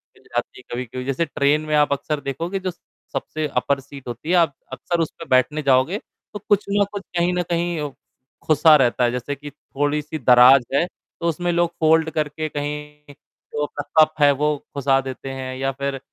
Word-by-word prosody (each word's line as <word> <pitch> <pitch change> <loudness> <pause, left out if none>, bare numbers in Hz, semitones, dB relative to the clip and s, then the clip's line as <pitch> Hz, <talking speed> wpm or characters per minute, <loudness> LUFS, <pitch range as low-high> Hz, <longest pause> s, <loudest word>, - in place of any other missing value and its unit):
मिल - - -23
जाती - - -4
है - - -15
कभी-कभी, 125 +1 -5
जैसे 135 +5 0
ट्रेन 145 +1 +1
में 155 - 0
आप 150 -1 +3
अक्सर 150 +1 -2
देखोगे 170 +8 -3
जो 185 -1 -3
स 175 - -25 0.3
सबसे 155 0 -3
अपर 140 +2 +1
सीट 140 -1 -12
होती 120 +6 -6
है 180 - +4
आप 165 -5 +3 0.2
अक्सर 170 +7 -2
उस 160 - 0
पे 165 - -7
बैठने 130 +4 +3
जाओगे 135 +7 +3 0.4
तो 210 - -5
कुछ 205 0 +4
न 200 0 +3
कुछ 200 - -4 0.2
कहीं 175 +1 +2
न 180 - 0
कहीं 170 -4 -1 0.5
खुसा 155 0 +6
रहता 125 -3 +3
है 120 - +3
जैसे 125 +3 -3
कि 145 +1 -9
थोड़ी 145 +1 -2
सी 155 +2 -6
दराज 125 +1 +7
है, 140 - +3
तो 170 -1 -8
उसमें 175 +2 -1
लोग 170 0 +2
फोल्ड 160 0 +4
करके 155 0 -2
कहीं 150 0 -6 0.4
जो 150 - -1
अपना 145 0 -6 0.2
कप 155 0 -2
है 145 0 +7
वो 150 +2 +1 0.2
खुसा 135 -1 +2
देते 135 0 -7
हैं 130 -1 -5
या 135 +1 -1
फिर 140 0 -3
150 Hz, 205 wpm, -22 LUFS, 135-160 Hz, 0.5 s, दराज